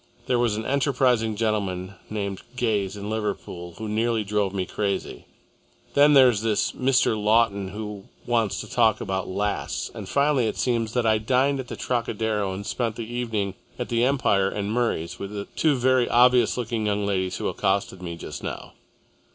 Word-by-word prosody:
There 125 -2 +1
was 120 -3 +2
an 110 - -4
enterprising 125 -5 +2
gentleman 100 -4 -1 0.2
named 100 -3 -3
Gayes 105 -5 0
in 100 0 -6
Liverpool, 95 -5 -4
who 110 - -5
nearly 110 +1 0
drove 105 -1 0
me 95 -1 -2
crazy, 100 +1 -3 0.7
then 145 +1 +6
there's 125 -6 +6
this 110 -2 +1
Mr. 130 -3 +2
Lawton 105 -2 +2
who 105 0 -7 0.2
wants 115 -4 +1
to - - -9
talk 115 -3 +3
about 95 -1 -2
lasts, 100 +2 -2
and - - -8
finally 140 -4 +2
it - - -3
seems 115 -3 0
that 125 -2 +1
I 110 -1 +3
dined 130 +5 +2
at 130 - -5
the - - -6
Trocadero 110 -4 -1
and 95 +2 -6
spent 115 -1 -2
the 115 - -5
evening 110 -4 -2 0.2
at 125 - -4
the 120 0 +1
Empire 105 -7 +2
and 100 +1 -3
Murray's 90 -8 -1
with 100 +1 -6
the 100 -1 -4
two 155 -3 +3
very 130 -1 +2
obvious 125 +1 +4
looking 115 -3 -2
young 105 0 0
ladies 95 -2 -1
who - - -2
accosted 95 -1 -1
me 85 -2 -5
just - - -7
now. - - -6
110 Hz, 175 wpm, -25 LUFS, 100-120 Hz, 0.7 s, then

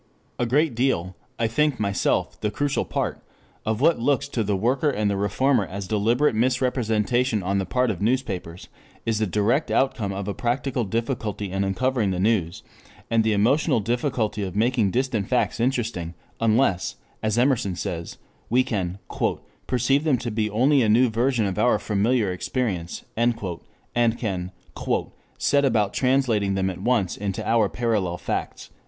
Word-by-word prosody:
A 120 - +1
great 145 +3 +2
deal, 105 -8 0 0.2
I 115 - 0
think 140 +4 +1
myself 100 -2 0
the 105 - 0
crucial 140 +1 -1
part, 80 - -2 0.5
of 110 +2 0
what 165 0 +4
looks 135 +3 +1
to 115 - -1
the 105 -1 0
worker 130 +8 +1
and 105 -6 0
the - - 0
reformer 105 +5 +2
as 100 0 -6
deliberate 115 +8 +2
misrepresentation 120 -2 +1
on 100 +2 0
the 95 - -2
part 125 +4 +1
of 95 - -6
newspapers, 100 -8 -2 0.4
is 115 -1 0
the 110 - +1
direct 105 - +1
outcome 120 -7 +1
of 100 0 -4
a 100 - -1
practical 125 +1 -1
difficulty 110 -2 -3
in 95 +1 0
uncovering 110 +3 0
the 90 -1 -1
news, 95 -5 0 0.5
and 115 -1 +3
the 110 -1 +2
emotional 125 +6 +3
difficulty 115 -1 -1
of 95 -2 -4
making 115 -1 +2
distant 120 -3 -1
facts 125 -1 0
interesting 115 -9 -1 0.2
unless, 110 -4 +2 0.3
as 110 0 0
Emerson 120 -7 +2
says, 85 -1 -5 0.3
we 125 +2 +4
can 95 -7 -2 0.7
"perceive 130 +3 +2
(them) 150 -5 +2
to 120 0 -4
be 110 0 0
only 130 +7 +3
a 110 - +2
new 120 +3 +5
version 120 0 +1
of 95 +1 -2
our 120 +3 +4
familiar 105 0 +1
experience" 90 -3 -3
and 120 0 +2 0.8
can 95 -6 -3 0.9
"set 140 0 +2
about 110 -7 +2
translating 125 -7 +2
(them) 95 0 0
at 90 - -9
once 110 -5 +1
into 100 -2 -4
our 115 -3 +3
parallel 105 -7 -1
facts." - - -4
110 Hz, 160 wpm, -24 LUFS, 100-125 Hz, 0.9 s, new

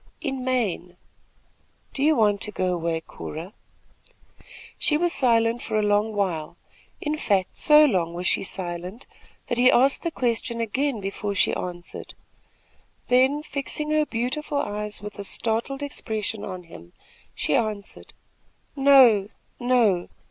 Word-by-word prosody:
"In 270 -3 -3
Maine." 205 -9 -1 1.0
"Do 275 - -5
you 310 +2 +4
want 205 -3 +2
to 210 - -3
go 185 -2 -1
away, 165 -1 -2
Cora?" 165 +4 -8 1.3
She 300 - +3
was 345 +1 +1
silent 230 -2 +3
for 215 - -2
a 215 - +2
long 210 +1 +1
while, 175 -7 -2 0.4
in 300 0 -2
fact, 195 -9 0
so 300 0 +7
long 175 - 0
was 180 +1 -5
she - - +2
silent 180 +3 -4 0.4
that 240 -1 -2
he 250 +1 +6
asked 265 +3 +4
the 335 - -1
question 235 -4 -1
again 235 +2 -1
before 200 +1 -4
she - - +2
answered. 175 -1 -6 0.9
Then, 265 +4 +3
fixing 300 +1 -4
her 305 -1 +2
beautiful 270 +6 -2
eyes, 210 -5 -3
with 210 0 -8
a - - -4
startled 230 +7 -2
expression, 220 -6 -4
on 185 -3 -6
him, 85 - -14 0.4
she - - 0
answered: 215 -3 -3 0.6
"No, 260 -8 +6 0.3
no! 235 -8 +2
220 Hz, 140 wpm, -24 LUFS, 195-265 Hz, 1.3 s, so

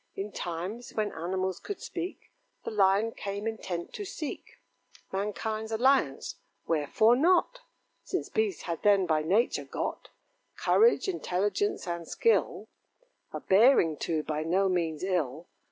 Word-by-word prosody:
In 200 +2 -4
times 180 +8 -5
when 215 -1 0
animals 185 +2 -2
could 410 - -6
speak, 350 +1 -6 0.3
The - - -3
Lion 205 +1 +3
came 200 -1 -5
intent 185 -6 -4
to 415 - -5
seek 330 -6 -7 0.5
Mankind's 215 +3 -3
alliance 230 - +2 0.3
wherefore 165 +9 +3
not? 360 - +3 0.4
Since - - -3
beasts 435 -4 -1
had 170 -2 -4
then 200 -2 +4
by 155 -3 +2
nature 200 +10 +1
got - - -4 0.5
Courage, 465 -1 +3
intelligence, 340 - -1
and 170 -1 -4
skill; 460 - +1 0.6
A - - -4
bearing, 195 - +5
too, 155 0 -2
by 155 0 -2
no 185 +5 +2
means 170 -4 -1
ill. 165 -5 -1
195 Hz, 130 wpm, -29 LUFS, 170-240 Hz, 0.6 s, bearing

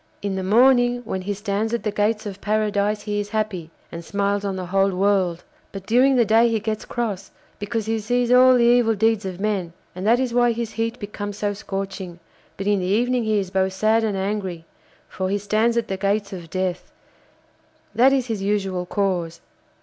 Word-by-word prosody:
'In 200 -1 -2
the 190 - -2
morning 245 +4 +4
when 190 -4 -3
he 200 +2 -3
stands 210 +3 -2
at 235 - -5
the 210 - -1
gates 215 +2 0
of 200 -1 -7
paradise 210 0 0
he 205 -1 -2
is 205 0 -4
happy, 210 -6 -3 0.2
and 170 0 -7
smiles 200 +2 -1
on 195 -1 -2
the 185 -1 -4
whole 195 +2 +2
world, 185 -3 +1 0.3
but 195 -1 -8
during 255 +5 +4
the 240 -2 +4
day 225 +2 +4
he 225 -1 0
gets 215 0 -3
cross, 210 -5 -4 0.3
because 215 +1 -3
he 225 0 -1
sees 245 +3 0
all 255 +1 +7
the 240 - +3
evil 240 -2 +4
deeds 220 0 +1
of 185 -1 -5
men, 195 -5 -2 0.2
and 185 +3 -4
that 235 +2 +4
is 255 -2 -1
why 240 -1 +3
his 230 -1 -4
heat 230 +1 -2
becomes 205 -2 -6
so 205 -1 -1
scorching; 195 -3 -6 0.4
but 195 - -5
in 205 -1 +2
the 180 - -2
evening 240 +5 +1
he 215 -1 +1
is 190 -3 -2
both 190 0 0
sad 215 +3 +2
and 210 -3 -1
angry, 190 -4 -3 0.4
for 185 0 -3
he 200 - +1
stands 215 +3 +1
at 230 -1 0
the 190 - -3
gates 200 +1 -1
of 170 -3 -8
death; 185 0 -3 1.0
that 255 +3 +5
is 270 -2 +1
his 225 -5 -3
usual 195 -3 -1
course. 180 -5 -1
205 Hz, 205 wpm, -22 LUFS, 195-225 Hz, 1.0 s, all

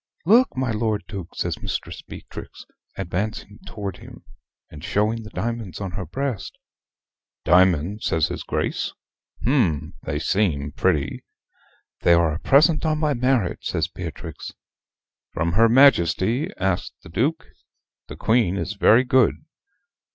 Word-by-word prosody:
"Look, 230 - +4
my 130 -2 0
Lord 110 -1 -1
Duke," 95 -5 -8
says - - -3
Mistress - - -4
Beatrix, - - -10 0.3
advancing 100 +3 -4
to 105 -2 -6
him, 90 - -12 0.5
and 75 0 -11
showing 105 +3 0
the 105 - -10
diamonds 115 -6 -4
on 95 -3 -4
her 90 -1 -5
breast. 130 - -4 0.9
"Diamonds," 90 +2 +3
says 80 -2 +1
his - - -5
Grace. - - -2 0.5
"Hm! 90 - +1
they 75 - -3
seem 75 -5 0
pretty." 70 -1 0 0.8
"They 85 - +4
are 85 -2 +2
a 80 - -4
present 150 +3 +4
on 155 -1 +1
my 150 -1 +1
marriage," 125 -6 0
says - - 0
Beatrix. - - -7 0.8
"From 85 +1 0
her 115 +6 +4
Majesty?" 115 - +4
asks 95 -1 -1
the - - -12
Duke. - - -1 0.6
"The - - -8
Queen 110 -5 +2
is 100 - -3
very 110 +4 +5
good." 130 -2 +3
105 Hz, 135 wpm, -23 LUFS, 85-125 Hz, 0.9 s, very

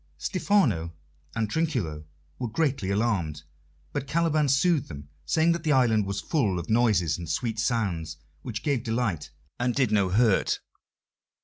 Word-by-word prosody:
Stephano 110 - +1 0.4
and 110 -1 0
Trinculo 105 - -2 0.3
were 125 - -2
greatly 130 -5 -1
alarmed, 100 -9 0 0.5
but 135 - -3
Caliban 155 -1 +2
soothed 140 +2 +2
them, 70 -2 -9 0.2
saying 160 - +3
that 170 -1 -1
the 155 -2 +2
island 110 -6 +3
was 100 0 -2
full 110 - 0
of 85 +1 -4
noises 105 -9 +2
and 85 -3 -7
sweet 115 +2 -2
sounds 95 -10 -1 0.2
which 110 -3 -5
gave 140 -5 +1
delight 110 -8 -2 0.3
and 120 0 0
did 130 -6 +2
no 100 -3 +3
hurt. 105 +1 +2
115 Hz, 145 wpm, -27 LUFS, 95-140 Hz, 0.5 s, saying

